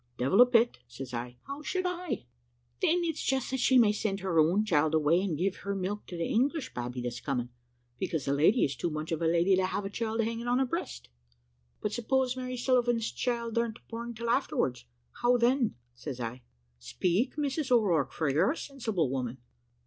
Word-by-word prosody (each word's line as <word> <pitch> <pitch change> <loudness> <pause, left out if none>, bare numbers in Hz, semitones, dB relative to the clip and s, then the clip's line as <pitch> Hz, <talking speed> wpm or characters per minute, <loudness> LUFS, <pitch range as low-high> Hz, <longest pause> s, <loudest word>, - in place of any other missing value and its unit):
"`Devil 185 - +4
a 250 - +9
bit,' 235 - +3
says 125 +1 -8
I; 120 +1 -5
`how 280 +2 -6
should 370 +3 -2
I?' 360 - -3 0.6
"`Then 345 +2 +3
it's 325 -2 -2
just 265 -1 0
that 265 - -1
she 260 +1 +4
may 225 -4 +6
send 205 -1 -2
her 180 -4 +1
own 175 +7 +4
child 160 -4 +2
away, 160 +3 +3
and 185 -6 -1
give 185 +4 0
her 200 0 -4
milk 195 +2 -3
to 175 - -7
the 165 - -1
English 275 +5 0
babby 125 +1 -4
that's 120 0 -4
coming; 125 -3 -2 0.5
because 165 -7 -2
the 140 - +1
lady 165 - +4
is 140 - -3
too 170 - -2
much 155 +1 -4
of 165 0 -1
a 165 - +2
lady 170 +3 +4
to 185 0 +2
have 200 +1 -3
a 195 - -4
child 225 +1 -1
hanging 230 +1 -2
to 245 0 +2
her 265 +1 +3
breast.' 335 +8 -5 0.7
"`But 210 - 0
suppose 255 +3 0
Mary 255 -1 -4
Sullivan's 240 -2 +1
child 235 -2 -1
ar'n't 235 -1 -1
born 235 +1 -5
till 235 +1 -2
afterwards, 135 - 0 0.4
how 245 +1 +4
then?' 240 0 +2 0.2
says 125 +2 -7
I. 120 +1 -5 0.4
`Speak, 175 - 0
Mrs 290 -1 -1
O'Rourke, 175 - +3
for 160 - -1
you're 145 - +3
a - - -10
sensible 225 - -2
woman.' 130 -2 -3
210 Hz, 200 wpm, -30 LUFS, 155-245 Hz, 0.7 s, a